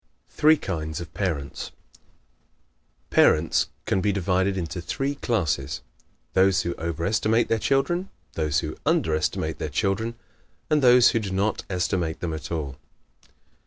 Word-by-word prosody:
Three 155 +1 +5
Kinds 80 - -4
of 85 - -8
Parents 80 -9 -3 1.4
¶ - - -42
Parents 80 +1 +4 0.2
can 95 - +1
be 105 - +2
divided 95 0 +1
into 90 0 -4
three 135 +10 -2
classes 80 - -1 0.5
those 95 0 +4
who 85 - -2
over 85 0 -3
estimate 110 +2 +2
their 115 - +2
children, 140 - +1 0.2
those 75 -2 0
who 75 - -5
under 80 - +2
estimate 80 - -1
their - - -3
children, 110 +4 -1 0.6
and 150 -1 +4
those 125 -2 +7
who 115 - +1
do 105 -3 -4
not 100 +3 -1
estimate 90 -3 -1
them 85 -2 -3
at 80 0 -6
all. 70 -5 -3
95 Hz, 145 wpm, -25 LUFS, 80-110 Hz, 1.4 s, those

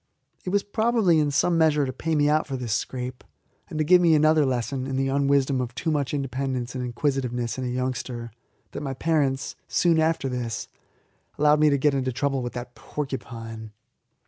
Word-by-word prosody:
It - - -2
was 200 +1 +1
probably 220 -5 +2
in 150 -1 +2
some 165 +4 +2
measure 150 -3 +3
to 130 - -4
pay 160 +5 -2
me 145 -1 +3
out 155 +1 +2
for 135 -2 -3
this 120 -4 -3
scrape, 125 +3 -4 0.5
and - - -5
to 155 - +2
give 180 +3 +6
me 165 -2 +5
another 155 -1 +4
lesson 130 +1 -2
in 135 - -3
the 135 0 0
unwisdom 140 -1 +2
of 120 -1 -5
too 165 - -1
much 145 -3 0
independence 135 -2 -2
and 130 -1 -3
inquisitiveness 125 -1 -2
in 130 - -2
a - - -1
youngster, 125 -1 -3 0.4
that - - -6
my 135 -2 -4
parents, 140 -3 0
soon 170 -2 +3
after 160 -3 +1
this, 125 -3 -3 0.7
allowed 150 0 +4
me 155 0 +5
to 140 - +3
get 145 +1 +2
into 130 -1 0
trouble 135 +1 -1
with 120 -1 -4
that 125 0 -7
porcupine. 115 -7 -6
135 Hz, 195 wpm, -25 LUFS, 125-155 Hz, 0.7 s, give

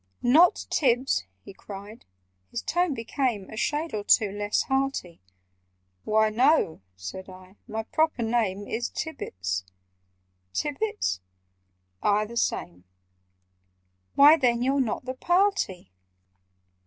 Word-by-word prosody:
"Not 315 +9 +5
Tibbs!" 250 - +2 0.2
he - - -11
cried—his 95 - -11
tone 350 -4 0
became 230 -3 -2
A - - -7
shade 300 +8 -1
or 210 -1 -2
two 205 -1 +4
less 205 +1 0
hearty— 265 -10 -2 0.8
"Why, 215 0 +3
no," 250 - +3
said 95 - -8
I. 185 +1 -14
"My 220 0 -3
proper 310 0 0
name 220 -4 0
Is 240 +2 -2
Tibbets—" 95 - -4 0.9
"Tibbets?" 210 - -1 0.8
"Aye, 210 +1 +2
the 235 +2 -10
same." 90 - -2 1.3
"Why, 295 +3 +8
then 240 -3 +2
YOU'RE 270 +2 +2
NOT 245 0 -2
THE 255 - -3
PARTY!" 350 - 0
220 Hz, 110 wpm, -26 LUFS, 190-270 Hz, 1.3 s, Why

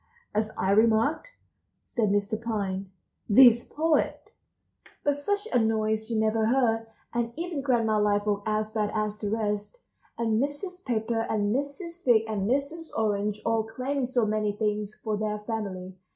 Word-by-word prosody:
"As 215 +1 0
I 190 - +1
remarked," 225 - +3 0.6
said 225 -5 0
Mr. 205 +2 0
Pine, 200 -4 -2 0.4
"this 240 +1 +7
poet"— 315 +1 0 0.7
But 290 -1 +2
such 405 +9 -1
a - - +5
noise 220 0 0
you 225 -2 0
never 220 0 +2
heard, 225 -2 +2 0.3
and 235 0 -1
even 335 -3 -3
Grandma 230 -5 +2
Liveoak 205 0 +1
as 215 0 0
bad 215 -1 0
as 215 -1 -1
the 210 - -2
rest, 210 - -2 0.4
and 225 -1 +1
Mrs. 360 +7 -4
Pepper 225 -1 -1
and 210 0 +1
Mrs. 335 +5 -4
Fig 230 -3 +5
and 210 -2 -1
Mrs. 285 +5 -1
Orange, 210 -1 0
all 225 -1 +2
claiming 255 +4 -2
so 245 -3 +1
many 215 -1 0
things 210 0 -2
for 215 -2 -3
their 210 0 -1
family. 200 -4 -5
220 Hz, 150 wpm, -27 LUFS, 210-255 Hz, 0.7 s, this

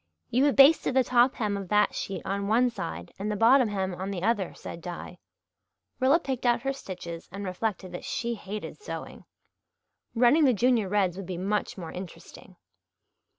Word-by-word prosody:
"You 255 +4 +3
have 290 - +2
basted 275 -1 +6
the 260 - +5
top 250 +1 +3
hem 210 -3 -1
of 195 -2 -6
that 210 0 +3
sheet 195 - -4
on 200 +1 -2
one 240 +4 +3
side 85 - -6
and 210 +2 -2
the - - -1
bottom 240 +4 +5
hem 190 -3 -2
on 190 +2 -5
the 185 -3 -4
other," 205 -4 +1
said 170 - -8
Di. 175 +1 -8 0.8
Rilla 270 +6 +4
picked 265 -6 -4
out 240 -1 +2
her 270 0 0
stitches 175 -9 -8
and 200 +2 -6
reflected 185 0 -3
that 175 - -7
she 235 0 -2
hated 210 - -7
sewing. 420 - -8 0.9
Running 250 +7 +5
the 255 -3 +4
Junior 235 -2 +2
Reds 190 -3 +1
would 195 -3 -7
be 185 -2 -4
much 205 +4 -2
more 170 -4 -7
interesting. 180 -1 -10
210 Hz, 185 wpm, -27 LUFS, 185-245 Hz, 0.9 s, basted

